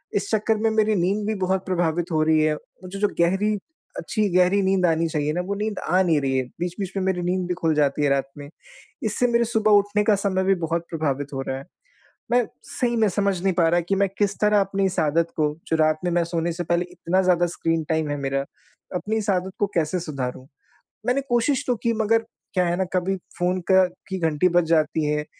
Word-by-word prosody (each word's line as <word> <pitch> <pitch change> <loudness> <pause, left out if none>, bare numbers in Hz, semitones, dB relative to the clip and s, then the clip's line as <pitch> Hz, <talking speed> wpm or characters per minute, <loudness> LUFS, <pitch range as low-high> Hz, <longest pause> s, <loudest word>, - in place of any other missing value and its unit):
इस - - -1
चक्कर 220 +1 +1
में 225 - +4
मेरी 220 -1 +2
नींद 195 +3 0
भी 220 - 0
बहुत 190 0 -1
प्रभावित 175 -1 -1
हो 155 -1 +2
रही 155 0 +3
है। 155 0 +2 0.3
मुझे 185 +2 -7
जो 205 - +3
गहरी 195 +5 +2 0.4
अच्छी 215 -2 -1
गहरी 185 +2 +4
नींद 190 -1 +2
आनी 165 -1 +2
चाहिए 150 -1 -1
ना, 175 - -1
वो 195 +3 -3
नींद 210 0 -3
आ 185 +1 +2
नहीं 165 -5 +3
रही 135 -1 0
है। 130 - +1 0.2
बीच-बीच 180 +2 -3
में 190 - 0
मेरी 190 -1 0
नींद 180 +1 -1
भी 180 - 0
खुल 165 -3 0
जाती 145 0 +1
है 145 - +3
रात 135 -1 0
में। 145 0 -9 0.5
इससे 220 +3 +1
मेरे 235 0 +2
सुबह 220 -2 +1
उठने 205 +1 0
का 210 0 +4
समय 195 -1 0
भी 195 +1 +3
बहुत 170 +1 -1
प्रभावित 145 -3 -2
हो 135 - -2
रहा 130 - -2
है। 135 - -9 0.7
मैं 245 -1 +3 0.2
सही 240 -1 -1
में 220 -2 +3
समझ 195 -1 0
नहीं 190 0 +2
पा 170 -2 +3
रहा 175 +1 +3
कि 195 - +2
मैं 200 0 +2
किस 205 -1 0
तरह 210 -1 +4
अपनी 195 0 0
इस 190 - -3
आदत 165 +2 +1
को, 150 -1 +1
जो 160 - +1
रात 155 0 +2
में 175 - +1
मैं 170 0 +2
सोने 170 0 -2
से 175 +1 -4
पहले 170 +1 +1
इतना 180 +1 0
ज़्यादा 175 -1 +3
स्क्रीन 165 0 0
टाइम 160 -2 0
है 145 - -1
मेरा, 135 0 -1 0.5
अपनी 210 +4 -2
इस 215 -1 0
आदत 185 0 -1
को 205 - +2
कैसे 170 +2 0
सुधारूँ? 130 -5 -5 0.6
मैंने 250 +3 +1
कोशिश 250 +4 +1
तो 250 - +2
की, 235 - +2
मगर 225 +1 +1 0.3
क्या 180 -2 +2
है 175 0 0
ना, 190 - +1
कभी 185 +1 0 0.2
फोन 180 +1 0
का 190 0 +7 0.3
की 190 - -2
घंटी 160 0 +2
बज 175 -1 +3
जाती 155 -1 +2
है, 150 0 -1
180 Hz, 230 wpm, -23 LUFS, 160-205 Hz, 0.7 s, का